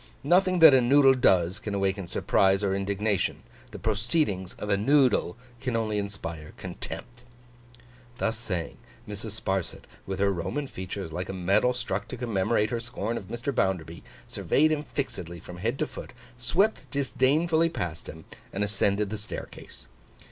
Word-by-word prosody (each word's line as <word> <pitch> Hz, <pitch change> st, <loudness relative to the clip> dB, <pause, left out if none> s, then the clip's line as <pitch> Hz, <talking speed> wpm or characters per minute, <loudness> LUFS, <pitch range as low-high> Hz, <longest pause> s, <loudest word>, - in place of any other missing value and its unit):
Nothing 185 Hz, +4 st, +3 dB
that 160 Hz, -3 st, +10 dB
a 130 Hz, -, +6 dB
Noodle 135 Hz, +2 st, +6 dB
does, 95 Hz, -6 st, +3 dB
can 105 Hz, -3 st, -4 dB
awaken 95 Hz, -1 st, -1 dB
surprise 95 Hz, +3 st, +2 dB
or 95 Hz, -1 st, +1 dB
indignation; 100 Hz, +1 st, -1 dB, 0.3 s
the -, -, -9 dB
proceedings 110 Hz, -, 0 dB
of -, -, -6 dB
a -, -, +5 dB
Noodle 120 Hz, -3 st, +3 dB, 0.2 s
can 125 Hz, -2 st, -2 dB
only 110 Hz, -2 st, 0 dB
inspire 85 Hz, -6 st, -6 dB
contempt.' 120 Hz, -1 st, -7 dB, 1.0 s
Thus 115 Hz, -1 st, 0 dB
saying, 95 Hz, -7 st, -4 dB, 0.3 s
Mrs. 105 Hz, +1 st, -6 dB
Sparsit, 95 Hz, -3 st, -2 dB, 0.2 s
with 95 Hz, 0 st, -3 dB
her 100 Hz, 0 st, +3 dB
Roman 120 Hz, -, -3 dB
features 95 Hz, -, -6 dB
like 90 Hz, +3 st, -4 dB
a -, -, -3 dB
medal 95 Hz, +6 st, +2 dB
struck 110 Hz, -5 st, -3 dB
to 130 Hz, -, -6 dB
commemorate 110 Hz, -2 st, 0 dB
her 120 Hz, -, -1 dB
scorn 115 Hz, -1 st, -3 dB
of 100 Hz, -, -6 dB
Mr. 120 Hz, +6 st, -3 dB
Bounderby, 90 Hz, -6 st, -1 dB, 0.3 s
surveyed 155 Hz, +2 st, +2 dB
him 155 Hz, -1 st, 0 dB
fixedly 90 Hz, -, -5 dB
from 90 Hz, +2 st, -10 dB
head 115 Hz, +8 st, -1 dB
to -, -, 0 dB
foot, -, -, -9 dB, 0.2 s
swept 175 Hz, -, +1 dB
disdainfully 155 Hz, +5 st, +2 dB
past 85 Hz, -, -5 dB
him, 80 Hz, +1 st, -10 dB, 0.3 s
and 100 Hz, -, -1 dB
ascended 100 Hz, 0 st, +1 dB
the 110 Hz, -, -3 dB
staircase. 105 Hz, -, -9 dB
105 Hz, 155 wpm, -27 LUFS, 95-125 Hz, 1.0 s, that